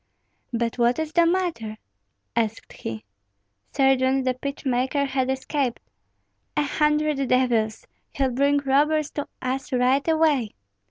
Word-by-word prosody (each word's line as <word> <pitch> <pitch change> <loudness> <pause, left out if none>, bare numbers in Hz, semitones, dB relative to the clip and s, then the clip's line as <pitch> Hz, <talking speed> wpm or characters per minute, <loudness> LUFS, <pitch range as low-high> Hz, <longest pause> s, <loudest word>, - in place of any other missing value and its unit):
"But 235 0 -2
what 240 +1 +3
is 315 -1 -2
the 340 -1 +4
matter?" 335 -12 -1 0.6
asked 225 -1 -2
he. 110 -1 -6 0.7
"Sergeant, 265 -1 +2
the 255 - +2
pitch 280 +3 -6
maker 260 +2 +1
has 265 -1 -1
escaped." 265 -1 -1 0.8
"A 300 - +3
hundred 300 -1 +1
devils! 235 -4 +1 0.3
he'll 270 -2 0
bring 280 +3 +2
robbers 290 +2 +2
to 290 - -4 0.2
us 260 +1 -3
right 255 +3 +2
away." 310 -8 +2
270 Hz, 125 wpm, -24 LUFS, 250-290 Hz, 0.8 s, the